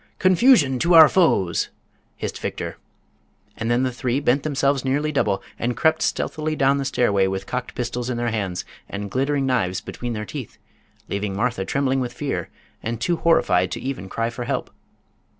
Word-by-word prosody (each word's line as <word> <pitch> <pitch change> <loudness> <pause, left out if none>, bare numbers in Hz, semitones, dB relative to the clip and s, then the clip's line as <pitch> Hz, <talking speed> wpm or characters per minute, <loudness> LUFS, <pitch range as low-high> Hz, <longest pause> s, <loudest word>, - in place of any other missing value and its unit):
"Confusion 185 - +4
to 170 +4 +3
our 160 -1 +11
foes!" 120 - +2 0.5
hissed - - -5
Victor. - - -4 0.8
And 110 - -3
then 120 +2 +2
the 130 - 0
three 125 +1 -1
bent 140 0 +2
themselves 140 -2 +1
nearly 145 +3 0
double 105 -9 0 0.2
and 120 0 -1
crept 160 +1 +2
stealthily 155 0 -1
down 135 -1 +3
the 135 - -2
stairway 100 -7 +2
with 95 0 -3
cocked 125 0 -4
pistols 125 0 -3
in 125 - -2
their 120 -1 -1
hands 95 -5 -3 0.2
and 100 -1 -5
glittering 135 +1 0
knives 95 -8 0
between 120 -1 -5
their 105 -1 -4
teeth, - - -7 0.5
leaving 100 -1 -3
Martha 115 -3 -1
trembling 135 +5 0
with 125 -1 -3
fear 135 +3 -3 0.3
and 115 0 -3
too 170 +8 0
horrified 95 - +3
to - - -4
even 125 -8 -5
cry 115 +3 -2
for 120 +1 -5
help. - - -2
125 Hz, 175 wpm, -23 LUFS, 110-140 Hz, 0.8 s, our